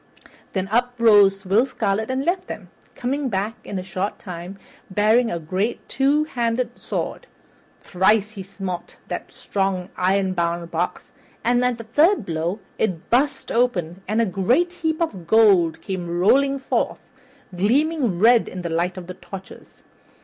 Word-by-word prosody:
Then 190 -1 -1
up 245 +3 +1
rose 205 -4 +5
Will 210 +8 +3
Scarlet 220 -2 -1
and 260 +1 -1
left 360 +2 0
them, - - -8 0.2
coming 270 +2 -2
back 205 +1 -1
in 200 - -5
a 185 - -3
short 190 +2 -3
time, 180 +1 -8 0.3
bearing 215 +5 +3
a 170 - -2
great 185 +8 -2
two 280 +3 +2
handed 240 -4 -2
sword. - - -4 0.5
Thrice 205 +3 +2
he 205 -3 -8
smote 190 -2 -6
that - - -5
strong, 190 -2 -2
ironbound 180 -3 0
box, - - -3 0.3
and 245 +2 +2
at 250 -1 +1
the 230 - -7
third 295 - +3
blow 170 +4 -2 0.2
it 180 -6 -2
burst 270 +3 +1
open 190 -8 0
and 215 +3 0
a 230 - +4
great 240 - +1
heap 320 -2 -2
of 190 - -5
gold 195 -6 +4
came 175 -3 -3
rolling 275 +8 +4
forth, 265 - -2 0.5
gleaming 250 - +1
red 230 +4 +5
in 185 -1 -7
the 170 - -3
light 170 +3 -1
of 180 - -7
the 185 - -7
torches. 190 +1 -12
205 Hz, 155 wpm, -22 LUFS, 185-245 Hz, 0.5 s, rose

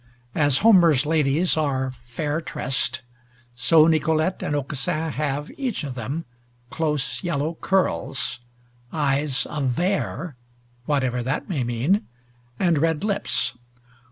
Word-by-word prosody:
As 145 -3 +3
Homer's 170 - +6
ladies 155 +2 +2
are 135 -4 0
"fair 145 +6 -4
tressed," 125 -5 -1 0.5
so 155 +6 +5
Nicolete 160 +2 +1
and 145 - -1
Aucassin 155 +3 -2
have, 145 0 -2
each 250 - -2
of 140 -3 -4
them, 130 +7 -4 0.5
close 150 -6 -1
yellow 155 -1 -1
curls, 160 -9 0 0.5
eyes 140 -2 +1
of 150 -2 -3
vair 175 +1 -1 0.5
(whatever 130 -4 +1
that 130 +4 -2
may 155 - -1
mean), 125 - 0 0.5
and 170 -5 +2
red 160 +1 +1
lips. 195 - 0
150 Hz, 115 wpm, -24 LUFS, 135-165 Hz, 0.5 s, Homer's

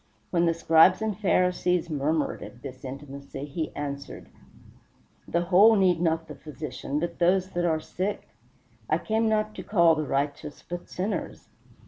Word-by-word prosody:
When 170 -1 +2
the 165 - +2
Scribes 165 +2 +5
and 215 -2 -1
Pharisees 180 -3 +1
murmured 155 0 -1
at 120 - -11
this 130 -2 -9
intimacy, 140 +1 -7
he 155 +2 -4
answered, 140 -1 -6 1.0
"The 170 - 0
whole 195 +6 +6
need 185 -4 +3
not 165 -1 0
the - - -8
Physician, 150 -1 -5
but 170 +1 -4
those 185 +2 +2
that 175 0 -1
are 160 -2 +1
sick; 190 +5 -4 0.6
I 155 - +3
came 220 +5 0
not 215 0 0
to - - -7
call 170 -5 +4
the 155 -2 -2
righteous, 145 +2 -3
but 175 0 -6
sinners." 195 +4 -4
170 Hz, 155 wpm, -26 LUFS, 150-185 Hz, 1.0 s, whole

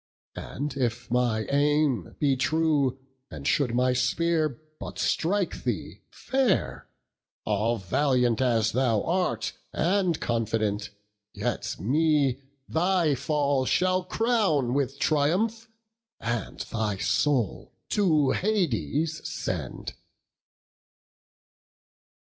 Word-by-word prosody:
And 145 +3 -5
if 120 -2 -2
my 120 -3 +1
aim 145 - +1
be 140 -2 +3
true, 145 -1 +1 0.3
and - - -9
should 140 -7 +2
my 125 +1 +3
spear 155 +3 +1 0.2
But - - -7
strike 190 +2 0
thee - - -3
fair, 250 - 0 0.6
all 110 +3 +1
valiant 125 +4 +1
as 115 -4 +2
thou 120 -4 +1
art, 165 -11 -1 0.2
And 180 0 +1
confident, 110 -3 -1 0.5
yet 115 +4 -2
me 140 - +2 0.3
thy 175 -2 +2
fall 140 -1 0
shall 185 0 +2
crown 190 - +1
With 140 0 -1
triumph, 190 +12 +1 0.5
and 120 0 -3
thy 110 -3 -2
soul 125 - 0 0.2
to 155 -9 +3
Hades 165 - 0
send." - - -4
140 Hz, 95 wpm, -27 LUFS, 120-165 Hz, 0.6 s, be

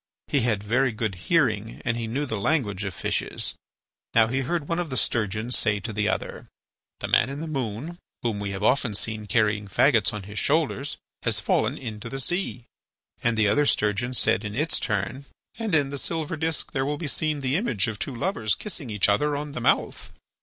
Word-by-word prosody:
He 145 - +3
had 110 -4 +1
very 125 +5 +2
good 110 -2 -2
hearing 110 - +1
and 115 - +1
he 115 -1 -3
knew 135 +6 -1
the 110 -6 -3
language 105 - 0
of 95 - -3
fishes. - - -1 0.6
Now 115 -1 +7
he 130 +4 -1
heard 145 +3 -1
one 165 +1 0
of 175 -3 -2
the 130 - -2
sturgeons 110 +2 0
say 105 -2 +2
to 110 +2 -5
the 105 +1 +1
other: - - -3 0.5
"The - - -2
man 120 - +4
in 140 +1 -5
the 160 - -4
moon, 140 +3 -4 0.2
whom 115 -4 0
we 100 -1 -3
have 100 +1 -4
often 125 -2 +2
seen 110 0 -2
carrying 105 -1 +2
fagots 115 +2 +4
on 105 -2 -5
his 105 +2 -4
shoulders, 145 -1 +1 0.2
has - - +1
fallen - - +1
into 110 -3 -6
the 135 - -4
sea." 155 -5 -1 0.6
And 115 -1 +2
the 110 -1 +4
other 145 +8 +3
sturgeon 105 +4 +1
said 110 - +3
in 105 -1 -5
its 155 +5 +1
turn: 110 +7 -2 0.3
"And 220 -7 0
in 145 -3 +3
the 140 0 -2
silver 165 +1 -1
disc 160 0 0
there 135 - 0
will 145 +2 -1
be 165 - -5
seen 150 0 0
the 130 +1 0
image 160 - +2
of 110 -2 -4
two 135 - -1
lovers 115 - 0
kissing 170 - -5
each 105 -2 +2
other 145 +9 +2
on 145 +1 -4
the 125 - -5
mouth." - - +1
120 Hz, 210 wpm, -26 LUFS, 105-145 Hz, 0.6 s, Now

